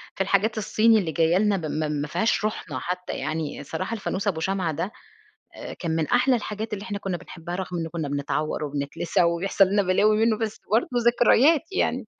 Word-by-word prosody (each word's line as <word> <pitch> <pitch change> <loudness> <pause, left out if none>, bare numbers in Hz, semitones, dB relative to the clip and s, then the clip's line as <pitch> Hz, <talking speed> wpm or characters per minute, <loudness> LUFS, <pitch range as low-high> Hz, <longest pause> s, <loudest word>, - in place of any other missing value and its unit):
في - - -3
الحاجات 200 +3 +1
الصيني 220 +2 +3
اللي 170 -5 -2
جايّة 165 +2 +2
لنا 205 -1 +2
م 155 -2 -2
مافيهاش 200 +8 0
روحنا 165 -10 -3
حتى 180 +5 -4
يعني، 155 -2 -3
صراحة 165 +9 -4
الفانوس 205 -2 -3
أبو 170 -5 0
شمعة 185 -1 -1
ده 165 +7 -3 0.6
أ - - -7
كان 170 - -4
من 160 -2 0
أحلى 250 +1 +3
الحاجات 215 -1 -4
اللي 200 - -4
إحنا 205 -3 -4
كُنّا 190 -3 -3
بنحبها 175 0 -8
رغم 180 -1 -4
إنه 165 0 -3
كُنّا 160 -3 -4
بنتعوّر 145 +2 -2
وبنتلسع 145 +4 -1
وبيحصَل 175 +3 +3
لنا 200 +1 +2
بلاوي 205 +3 +3
منه، 220 -2 +2
بس 220 -2 -3
برضه 225 +3 +3 0.2
ذكريات 245 +6 +5
يعني. 385 - 0
190 Hz, 185 wpm, -25 LUFS, 160-215 Hz, 0.6 s, ذكريات